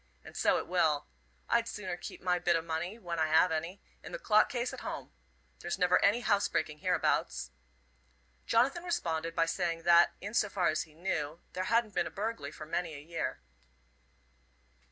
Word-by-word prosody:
And - - -12
so - - +3
it - - -3
will. 160 -5 +2 0.4
I'd 235 0 +2
sooner 185 -6 -4
keep 175 - -9
my 180 -1 +2
bit 175 0 +2
o' 165 - +1
money, 165 +5 -3
when 175 -6 -4
I 160 - +3
have 160 +3 +4
any, 165 +5 -3 0.2
in - - -10
the - - -4
clock 215 - +4
case 245 0 -2
at - - -6
home. - - -6 0.5
There's - - -3
never 180 0 +3
any 215 +4 +4
housebreaking 160 -8 0
hereabouts." 160 - 0 1.0
Jonathan 270 +9 +2
responded 165 - -2
by 165 - +3
saying 165 0 -1
that, 170 0 +6
in 205 +2 -6
so 215 -2 +2
far 190 -2 +1
as 155 0 0
he 155 -2 -21
knew, 165 -2 -3
there 185 0 -2
hadn't 230 0 +2
been 175 - +1
a - - -5
burglary 205 -9 -4
for 155 - -9
many 165 0 -2
a - - -7
year. 165 +3 -4
175 Hz, 185 wpm, -31 LUFS, 160-205 Hz, 1.0 s, that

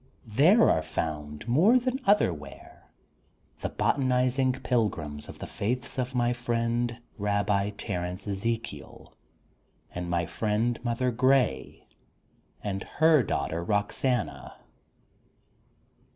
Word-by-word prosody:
There 155 - +5
are 80 - +3
found, 75 +1 -4
more 175 - +5
than 255 +1 -1
other 205 - +4
where, 75 -3 -13 0.7
the - - -3
botanizing 130 -1 +1
pilgrims 85 - -2
of - - -9
the - - -6
faiths 125 +5 -3
of 130 +1 -2
my 120 0 +2
friend 120 0 -1 0.2
Rabbi 100 0 +1
Terence 90 +2 -4
Ezekiel 110 -5 -4 0.8
and 90 0 -4
my 85 0 0
friend 110 +6 -1
Mother 125 +1 0
Grey 130 +2 +1 0.8
and 95 -2 -3
her 155 -2 +5
daughter 80 -3 -2
Roxana. 105 +6 -1
115 Hz, 105 wpm, -28 LUFS, 90-125 Hz, 0.8 s, There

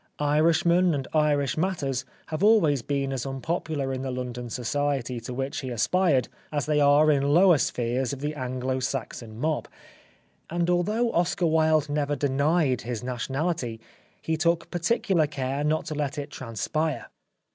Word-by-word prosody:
Irishmen 165 +3 +3
and 135 -2 -3
Irish 150 -3 +2
matters 145 -8 -1 0.2
have 155 +1 -3
always 170 - +4
been 140 +1 -2
as 130 -3 -3
unpopular 140 0 -3
in 130 - -3
the 135 - -3
London 125 -1 -5
society 130 0 -1
to 115 +2 -8
which 135 +2 -3
he 130 - -5
aspired, 130 - +2 0.2
as 145 -2 -1
they 150 0 +2
are 145 +2 +5
in 140 -2 +2
lower 175 -3 +6
spheres 125 +1 -1
of 140 - -5
the 150 +2 -2
Anglo 130 -1 -2
Saxon 120 -4 -4
Mob; 155 +2 -1 0.8
and 175 +1 0
although 215 +7 +1
Oscar 175 +1 +1
Wilde 155 -2 +3
never 145 0 -1
denied 140 0 +1
his 120 -2 -5
nation 125 +1 -4
ality 140 -8 -1 0.4
he 160 - -1
took 170 +1 0
particular 175 -2 +1
care 135 0 -3
not 155 +1 0
to - - -4
let 145 0 -2
it 145 0 -5
trans 115 -6 -7
spire. 155 -5 -1
145 Hz, 160 wpm, -26 LUFS, 130-160 Hz, 0.8 s, lower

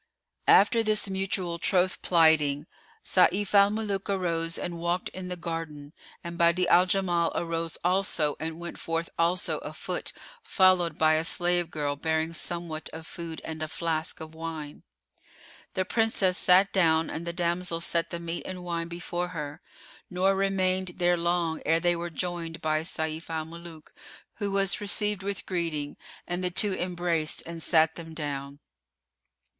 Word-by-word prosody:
After 230 +3 +6
this 215 -2 +1
mutual 190 -3 -1
troth 185 +1 +2
plighting, 155 -4 +4 0.4
Sayf 195 +2 +2
al 200 0 +7
Muluk 205 -2 -2
arose 165 -4 -1
and 170 -1 -4
walked 175 +2 -1
in 185 -1 -7
the 180 - -3
garden 165 -4 -5 0.3
and 170 0 -6
Badi'a 170 +2 +4
al 180 +1 +6
Jamal 180 -3 +1
arose 165 -1 -2
also 175 -5 +1
and 160 +1 -4
went 175 0 -7
forth 165 0 -2
also 175 +2 +1
afoot - - -4 0.3
followed 185 - +3
by 155 0 +5
a 155 0 +2
slave 175 0 +1
girl 145 -3 -2
bearing 160 +2 -1
somewhat 170 -2 -4
of 160 0 -8
food 165 -1 -7
and 160 -1 -6
a 155 - -2
flask[FN#454] 160 +1 -3
of 160 0 -8
wine. 160 -2 -7 0.9
The 185 - +1
Princess 205 -3 +2
sat 190 +2 +5
down 165 -4 +3
and 170 +2 -5
the - - -1
damsel 170 0 -1
set 170 0 0
the 170 - -5
meat 170 0 -4
and 185 -1 -6
wine 170 -1 -2
before 175 +1 -3
her: 150 -3 -6 0.5
nor 185 +1 +2
remained 190 -1 +1
they 175 0 +3
long 170 -1 0
ere 165 +1 +3
they 175 0 +2
were 170 +1 -4
joined 170 -1 -4
by 155 0 +1
Sayf 160 0 -3
al 160 -1 -2
Muluk, 165 -1 -11 0.4
who 205 -2 -1
was 195 0 +1
received 205 0 0
with 200 0 -4
greeting 165 -5 -2 0.3
and 175 +1 -3
the 180 - +2
two 195 +3 +2
embraced 175 -3 -1
and 170 0 -7
sat 160 -1 +4
them 165 -1 -9
down. 140 -2 -4
170 Hz, 160 wpm, -28 LUFS, 160-185 Hz, 0.9 s, al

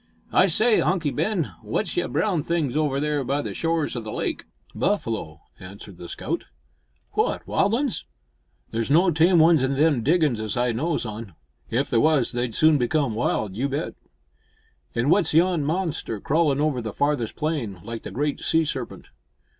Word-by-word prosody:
"I 185 - +5
say, 215 +6 +3
Hunky 170 -6 +1
Ben, 190 -5 -1
w'at's 115 - -2
yon 175 0 -1
brown 185 -7 +1
things 150 -4 -1
over 150 -3 +1
there 150 -1 0
by 140 +3 -1
the - - -4
shores 165 -4 -1
o' 120 - -3
the 110 -1 -7
lake?" - - -3 0.3
"Buffalo," 115 - -2 0.2
answered 95 0 -11
the 85 - -9
scout. - - -4 0.7
"What! - - 0
wild 205 +3 +1
uns?" 270 0 -1 0.7
"There's 115 +2 -2
no 175 +5 +4
tame 170 +3 +4
ones 160 -2 +6
in 130 +1 0
them 145 -3 +3
diggin's 150 -3 +2
as 110 +1 -3
I 120 0 +2
knows 150 +5 -1
on. 110 -5 -7 0.3
If 130 +5 -1
there 115 - +3
was, 155 -5 +3
they'd 120 -2 -2
soon 155 -2 +4
become 130 0 +1
wild, 110 -3 -1
you 135 +6 -1
bet." 140 - -3 1.0
"An' 115 - +1
w'at's 160 +3 +2
yon 170 -2 +3
monster 160 - -2
crawlin' 145 +2 +1
over 145 -4 0
the 110 -3 -5
farthest 145 -6 0
plain, 145 - -2
like 115 -1 -6
the - - -7
great 145 +1 -2
sea 160 0 +2
serpent?" 130 -4 -5
145 Hz, 175 wpm, -24 LUFS, 120-165 Hz, 1.0 s, ones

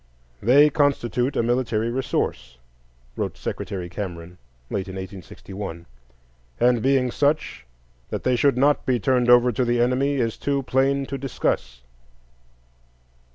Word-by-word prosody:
"They 145 +7 +5
constitute 135 -3 +1
a - - +1
military 115 -2 0
resource," 120 - -2 0.6
wrote - - -3
Secretary 90 -3 -5
Cameron, 90 -2 -7 0.3
late 95 -1 -2
in 95 - -7
1861; 95 -1 -8 0.7
"and 120 -2 +3
being 130 -1 +2
such, 145 - -1 0.4
that - - -4
they 130 - +2
should 140 0 +2
not 145 +3 +3
be 125 -2 +2
turned 125 +3 +1
over 125 0 +6
to 125 - 0
the 120 0 +1
enemy 130 +4 +1
is 115 -4 -1
too 140 -1 -1
plain 135 +2 +1
to 135 0 -5
discuss." - - -2
125 Hz, 130 wpm, -23 LUFS, 100-135 Hz, 0.7 s, over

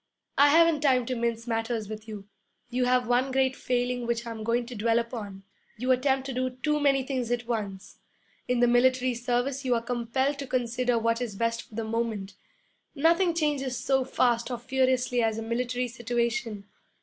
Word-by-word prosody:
'I 285 +1 +7
haven't 325 0 +5
time 260 -4 +3
to 255 - -2
mince 230 -1 -2
matters 225 -2 -2
with 215 +1 -8
you. 205 -2 -8 0.4
You 250 +1 +1
have 250 -1 +2
one 250 +2 +2
great 265 0 +2
failing 245 -1 -1
which 235 0 -1
I'm 225 -2 -6
going 235 +2 0
to 245 +1 -8
dwell 225 +2 +2
upon. 220 -5 -4 0.3
You 255 +3 0
attempt 265 +1 +2
to 270 - -4
do 255 +1 0
too 300 -1 +2
many 275 -2 +3
things 255 -3 -3
at 240 -1 -1
once. 205 -4 -5 0.5
In 250 -1 +1
the 245 - +5
military 255 +1 +3
service 245 +3 -1
you 250 -2 +2
are 230 - 0
compelled 250 +4 -1
to 275 - -5
consider 245 -1 0
what 230 +1 +1
is 230 -5 -4
best 230 +2 -1
for 215 - -16
the 225 - -2
moment. 220 -3 -3 0.6
Nothing 335 +4 +3
changes 285 -6 0
so 265 +1 +1
fast 240 -2 +1
or 245 - -3
furiously 255 0 +1
as 225 -1 +1
a 225 - -3
military 245 +2 -1
situation. 235 -3 -2
245 Hz, 185 wpm, -27 LUFS, 230-260 Hz, 0.6 s, I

